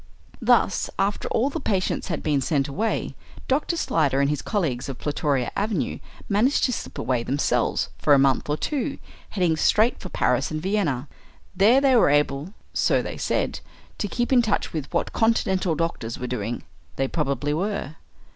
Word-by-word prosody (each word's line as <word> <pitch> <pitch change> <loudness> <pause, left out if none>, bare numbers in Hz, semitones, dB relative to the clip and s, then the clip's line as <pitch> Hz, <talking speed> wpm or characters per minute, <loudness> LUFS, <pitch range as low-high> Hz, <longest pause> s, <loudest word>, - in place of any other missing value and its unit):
Thus, - - +3
after 200 +1 0
all 265 +5 +1
the 325 - -3
patients 195 -9 -1
had 165 -5 -3
been 145 -2 +1
sent 140 -1 +1
away, 215 +11 -2 0.3
Dr. 295 +5 0
Slyder 145 - +1
and 140 +1 +2
his 150 -2 -2
colleagues 150 - -2
of 135 - -5
Plutoria 145 -3 -1
Avenue 205 +1 -1 0.3
managed 220 +8 +2
to 250 - +2
slip - - -6
away 125 -2 0
themselves 135 +4 0
for 145 - +5
a - - +5
month 135 +1 +2
or 150 - +1
two, 285 - -2 0.3
heading 180 -5 +1
straight 220 +8 +3
for 185 - -8
Paris 125 -3 +1
and 155 - -3
Vienna. 160 -8 -1 0.5
There 215 +8 +5
they 270 -2 +4
were 230 - +5
able, 145 +5 +1 0.2
so - - +2
they - - -6
said, - - -1 0.4
to 205 - -1
keep 240 +5 -1
in 250 - +6
touch 220 -3 -1
with 155 -4 -4
what 170 - -1
continental 190 -6 +1
doctors 155 -9 -3
were 125 - -5
doing. 120 -2 -3 0.3
They 135 - 0
probably 145 -1 -1
were. 180 -3 -3
160 Hz, 175 wpm, -24 LUFS, 140-215 Hz, 0.5 s, in